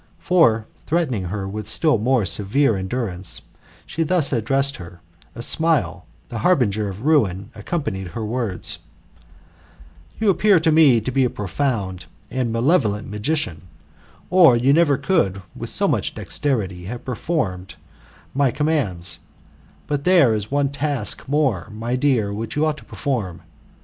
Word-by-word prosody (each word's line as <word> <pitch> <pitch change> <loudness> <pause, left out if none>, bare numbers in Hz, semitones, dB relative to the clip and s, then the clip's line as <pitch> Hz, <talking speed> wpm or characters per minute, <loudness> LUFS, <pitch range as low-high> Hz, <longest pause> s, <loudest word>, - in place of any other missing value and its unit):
For, 115 -12 +3 0.2
threatening 145 - 0
her 95 +2 -4
with 105 +1 -6
still 150 0 +3
more 125 +1 +2
severq 100 - +1
^endurance, 95 -7 -2 0.4
she 165 - -4
thus 160 -3 +1
addressed 135 +4 0
her, 85 0 -11 0.4
a 115 - -6
smile, 160 +3 +1 0.2
the 115 - -4
harbinger 110 - +2
of 100 +4 -8
ruin, 105 - +2
accompanying 110 - -3
her 110 +6 -5
words: 110 -4 -3 1.4
You 215 -2 +4
appear 190 +1 +4
to 160 0 +3
me 150 -7 +5
to 130 - -3
be 135 +1 +2
a 125 - +2
profound 100 -4 -3 0.2
and 130 -3 -1
malevolent 115 - +1
magician, 105 - -2 0.6
or 175 -9 +7
you 130 +4 +3
never 150 -3 +4
could 100 - 0
with - - -6
so - - +1
much - - 0
dexterity 100 -11 -2
have 120 +5 -7
performed 95 - -3 0.6
my 140 0 +2
commands: 125 - 0 0.7
but 145 -1 -2
there 170 -10 +5
is 105 -1 -3
one 140 0 +1
task 140 -6 -3
more, 135 - 0
my 115 +3 -3
dear, 125 -7 +1
which 110 +2 -5
you 150 +1 +2
ought 155 -1 -1
to - - -14
perform. 115 - -3
120 Hz, 145 wpm, -21 LUFS, 100-145 Hz, 1.4 s, or